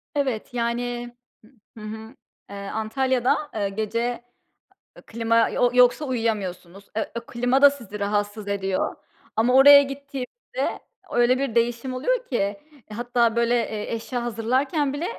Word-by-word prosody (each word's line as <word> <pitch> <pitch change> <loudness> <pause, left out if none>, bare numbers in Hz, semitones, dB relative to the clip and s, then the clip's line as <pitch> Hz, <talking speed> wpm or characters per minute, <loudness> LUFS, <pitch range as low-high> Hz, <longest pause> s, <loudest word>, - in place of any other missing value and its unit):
Evet, 260 -6 -2
yani, 240 0 -2 0.7
hıı, 215 - -9
hı - - -5
hı, 220 +3 -9 0.3
eee, 200 - -8
Antalya'da, 240 +6 0 0.2
eee, 205 -2 -1
gece 230 +4 -2 0.8
klima 230 0 +2
yo 245 - +2
yoksa 250 +4 +4
uyuyamıyorsunuz. 200 -6 -3
Eee, 220 - -2 0.2
klima 245 +3 +1
da 285 - +10
sizi 235 -7 -9
rahatsız 205 +1 -2
ediyor 195 -2 -1 0.4
ama 235 +3 +2
oraya 280 +1 +10
gittiğimizde 280 - -5 0.3
öyle 240 +1 +3
bir 270 -4 -2
değişim 235 +2 0
oluyor - - -1
ki 200 -5 -1 0.3
hatta 235 0 +1
böyle, 235 +1 +2
eee, 220 -2 -2
eşya 235 +2 -3
hazırlarken 260 +6 0
bile 295 +4 -3
235 Hz, 130 wpm, -24 LUFS, 220-260 Hz, 0.8 s, da